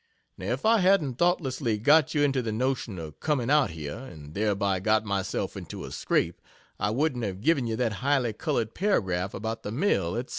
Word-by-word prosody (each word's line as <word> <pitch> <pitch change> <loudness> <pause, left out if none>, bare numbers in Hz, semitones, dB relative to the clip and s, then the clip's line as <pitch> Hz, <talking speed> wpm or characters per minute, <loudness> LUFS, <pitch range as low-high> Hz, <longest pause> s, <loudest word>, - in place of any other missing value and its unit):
Now, - - -7
if - - -4
I 225 0 +5
hadn't 180 -10 +2
thoughtlessly 135 -9 +1
got 145 +7 +4
you 145 - +3
into 135 -2 +2
the 115 -2 -3
notion 125 -3 -1
of 80 -3 -8
coming 140 -5 0
out 150 -5 +4
here, 75 -3 -6
and 80 - -11
thereby 100 -2 0
got 110 +3 +2
myself 100 -2 -2
into - - -7
a - - -9
scrape, - - 0 0.4
I 105 - +1
wouldn't 130 +1 0
have 95 -3 -3
given 135 0 +2
you 110 - -1
that 115 -2 0
highly 135 -4 +1
colored 110 +1 -2
paragraph 95 - 0
about 110 +2 -4
the 105 - -5
mill, 110 - +1
etc. 120 +2 -3
115 Hz, 195 wpm, -27 LUFS, 100-145 Hz, 0.4 s, I